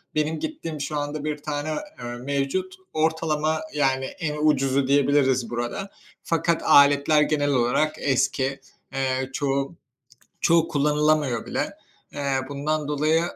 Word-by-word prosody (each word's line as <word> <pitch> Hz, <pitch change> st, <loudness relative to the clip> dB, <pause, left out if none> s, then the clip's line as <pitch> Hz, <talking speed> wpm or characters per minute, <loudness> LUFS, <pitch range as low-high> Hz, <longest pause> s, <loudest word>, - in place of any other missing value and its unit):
Benim 155 Hz, +1 st, 0 dB
gittiğim 165 Hz, -, -5 dB
şu 150 Hz, +1 st, -3 dB
anda 145 Hz, +1 st, -3 dB
bir 150 Hz, -1 st, -2 dB
tane, 145 Hz, 0 st, -4 dB, 0.3 s
eee, 120 Hz, -, -7 dB
mevcut. 140 Hz, +9 st, -2 dB, 0.2 s
Ortalama, 155 Hz, 0 st, 0 dB
yani, 135 Hz, -2 st, +1 dB
en 150 Hz, +1 st, -4 dB
ucuzu 135 Hz, -3 st, +2 dB
diyebiliriz 135 Hz, -4 st, +3 dB
burada. 120 Hz, +12 st, -4 dB, 0.3 s
Fakat 165 Hz, 0 st, 0 dB
aletler 145 Hz, +2 st, +5 dB
genel 145 Hz, -1 st, +1 dB
olarak 130 Hz, +5 st, +2 dB
eski. 135 Hz, 0 st, 0 dB, 0.3 s
Eee, 130 Hz, -1 st, -1 dB
çoğu, 140 Hz, +2 st, -1 dB, 0.7 s
çoğu 165 Hz, 0 st, +3 dB
kullanılamıyor 150 Hz, -4 st, +1 dB
bile. -, -, -3 dB, 0.4 s
Eee, 140 Hz, -1 st, -1 dB
bundan 150 Hz, +1 st, -2 dB
dolayı, 155 Hz, +2 st, +2 dB
145 Hz, 120 wpm, -24 LUFS, 135-155 Hz, 0.7 s, aletler